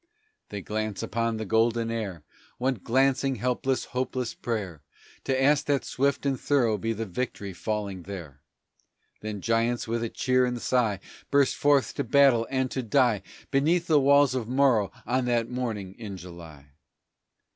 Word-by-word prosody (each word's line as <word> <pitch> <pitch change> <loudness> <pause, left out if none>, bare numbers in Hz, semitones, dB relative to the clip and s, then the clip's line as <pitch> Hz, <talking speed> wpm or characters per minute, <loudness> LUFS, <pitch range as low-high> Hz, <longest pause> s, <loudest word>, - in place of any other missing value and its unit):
They 100 -2 -6
cast 110 0 -3
upon 115 0 -1
the 110 - -4
golden 115 +1 +1
air 100 -8 -4 0.3
One 130 -4 -1
glancing, 135 +2 +2
helpless, 125 +3 -1
hopeless 125 -1 -3
prayer, 100 -10 -4 0.4
To 130 -1 +1
ask 145 +2 +3
that 140 -2 0
swift 140 +1 0
and 135 -2 0
thorough 120 -7 +2
be 115 - -1
the 115 0 -3
victory 100 -1 -4
falling 100 +1 -3
there; 85 -7 -9 0.8
Then 105 -2 -5
giants 115 +2 0
with 115 +1 -1
a 115 - -2
cheer 130 +1 +1
and 125 -1 -1
sigh 115 -6 +1 0.3
Burst 140 -2 +3
forth 145 -2 +2
to 140 - -2
battle 135 -6 +4
and 130 -1 -1
to 130 - -2
die 120 -3 +2 0.3
Beneath 160 +5 +2
the 155 -3 +4
walls 140 0 +5
of 125 -4 -2
Morro 125 -5 +3
on 125 +2 0
that 120 -1 0
morning 110 -7 -3
in 100 -4 -6
July. 80 -5 -12
120 Hz, 155 wpm, -27 LUFS, 105-130 Hz, 0.8 s, walls